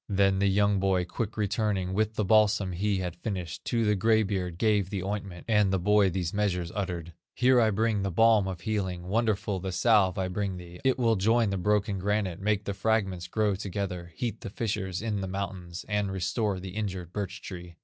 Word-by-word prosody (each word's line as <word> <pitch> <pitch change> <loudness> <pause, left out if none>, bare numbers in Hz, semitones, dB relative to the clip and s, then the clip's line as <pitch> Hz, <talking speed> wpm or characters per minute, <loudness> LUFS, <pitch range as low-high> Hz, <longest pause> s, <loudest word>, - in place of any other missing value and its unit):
Then 95 -1 +3
the 100 - +3
young 100 0 +3
boy 95 -2 +1
quick 110 +4 -4
returning 100 -3 0
With 110 +2 0
the 105 - 0
balsam 105 -2 +3
he 100 +3 0
had 90 -2 -3
finished, 90 -6 -5
To 115 -2 +1
the 105 - +3
gray 110 +2 +3
beard 95 -4 -3
gave 105 -2 +2
the 95 -3 -3
ointment, 100 -3 -5
And 105 -3 +3
the 95 - +2
boy 105 +2 +4
these 90 -2 -2
measures 90 -5 -1
uttered: 90 -4 -4 0.2
"Here 125 0 +4
I 110 - +4
bring 110 0 +1
the 100 - -1
balm 110 +1 +4
of 90 -2 -5
healing, 95 -5 -2
Wonderful 105 -2 0
the 95 +1 -4
salve 95 -1 +3
I 95 -1 0
bring 95 0 -2
thee; 90 0 -11
It 130 -1 +2
will 115 -4 +2
join 110 +2 +2
the 100 - -1
broken 100 0 +1
granite, 100 -2 -1
Make 105 0 +1
the 100 - -2
fragments 95 -5 0
grow 105 +2 +1
together, 95 -3 -4
Heat 120 -2 -3
the - - -6
fissures 100 -3 -3
in 105 -3 -1
the 95 - -3
mountains, 95 -2 -5
And 105 -2 0
restore 95 +2 -1
the 95 +1 -7
injured 95 -3 -4
birch 100 -3 -4
tree." 90 -3 -8
100 Hz, 205 wpm, -28 LUFS, 90-105 Hz, 0.2 s, boy